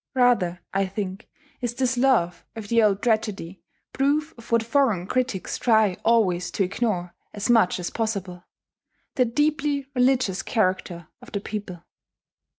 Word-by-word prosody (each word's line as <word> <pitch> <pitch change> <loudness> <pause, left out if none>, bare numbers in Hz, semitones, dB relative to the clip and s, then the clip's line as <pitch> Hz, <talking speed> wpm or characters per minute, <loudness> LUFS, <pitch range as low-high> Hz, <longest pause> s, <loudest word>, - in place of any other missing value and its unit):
Rather, 205 -9 +2
I 195 0 +1
think, 195 +1 -5 0.3
is 240 -1 -2
this 255 0 0
love 240 -10 +2
of 215 -2 -7
the 235 -1 +4
old 205 -2 +2
tragedy 215 -6 -1 0.3
proof 295 +3 0
of 235 0 -15
what 230 -1 +3
foreign 230 -7 +1
critics 250 -3 -2
try 220 -5 +3
always 190 -6 +2
to 200 - +1
ignore 185 -3 -2 0.2
as 210 +3 0
much 220 -6 +3
as 175 - -4
possible, 195 -6 -3 0.7
the 255 - +2
deeply 290 +2 0
religious 250 -6 +2
character 185 -5 -1
of - - -14
the 200 - -2
people. 200 -4 -6
220 Hz, 145 wpm, -24 LUFS, 185-245 Hz, 0.7 s, the